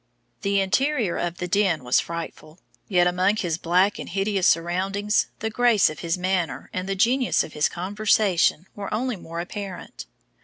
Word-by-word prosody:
The 200 -1 +1
interior 225 - +1
of 175 0 -3
the 180 - -4
den 180 -6 +1
was 125 0 +3
frightful, 165 -1 -7 0.3
yet 180 -3 +3
among 185 +3 +2
his 170 -6 -2
black 180 +4 +2
and - - -7
hideous 195 0 +1
surroundings 190 +5 +1
the 220 0 -2
grace 235 -6 +3
of 155 - -10
his 170 0 -1
manner 185 -2 -2
and 185 +1 -3
the 195 - 0
genius 245 +5 +2
of 155 - -10
his 150 - +1
conversation 190 -2 +1
were 200 -1 -6
only 245 +3 -1
more 170 -2 -7
apparent. 185 - -7
185 Hz, 165 wpm, -24 LUFS, 170-205 Hz, 0.3 s, was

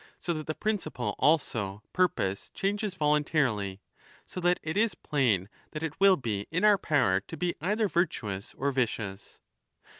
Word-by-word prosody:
So 175 - -2
that 155 -1 -5
the 155 - -2
principle 210 -7 -2
also, 110 -10 +1
purpose, 100 - 0
changes 200 0 -1
voluntarily. 145 - +1 0.4
So - - -7
that 175 0 +3
it 160 +2 -3
is 220 +1 +2
plain 115 -11 +1 0.3
that 155 - -4
it 160 -2 -4
will 195 -1 +6
be 105 -6 -3
in 175 +4 -1
our 205 -2 +6
power 130 - +2
to 100 - -10
be 175 -1 0
either 210 +5 +1
virtuous 110 - -2
or 140 +1 0
vicious. 110 -6 -3
150 Hz, 155 wpm, -29 LUFS, -, 0.4 s, will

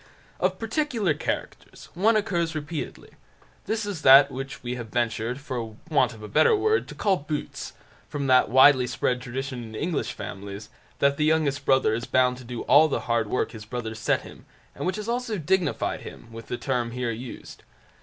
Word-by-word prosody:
Of - - +1
particular 225 - 0
characters, 145 - -5
one 215 +6 +3
occurs 170 -6 -1
repeatedly. 155 +1 -5 0.6
This 220 -1 -1
is 200 -7 -4
that 135 0 +8
which 135 +1 -6
we 120 0 -3
have 120 -2 -6
ventured, 120 +1 -1
for 120 -5 -5 0.2
want 130 -5 +3
of 105 - -12
a - - -6
better 435 - +4
word, 435 +2 +1
to - - -9
call 195 -3 +2
"Boots", 150 0 -5 0.4
from 145 -1 -3
that 130 -1 +4
widely 130 +1 +6
spread 125 +1 -1
tradition 130 +1 -5
in 110 -1 -9
English 165 +6 -2
families, 100 +1 -7 0.3
that 140 0 +2
the 150 - +2
youngest 150 -3 +1
brother 130 -4 +3
is 120 +2 -2
bound 125 -1 +2
to 125 - -11
do 120 0 -6
all 145 +4 +6
the 150 - -2
hard 115 -2 0
work 125 - 0
his 110 -2 -9
brothers 110 -1 -5
set - - +1
him, - - -13 0.3
and - - -4
which 185 - 0
has 210 0 -5
also 235 -2 -1
dignified 180 +2 0
him 115 - -11
with 115 0 -10
the 125 - -3
term 125 -4 -1
here 125 -1 -2
used. 120 +2 -8
135 Hz, 190 wpm, -25 LUFS, 120-160 Hz, 0.6 s, that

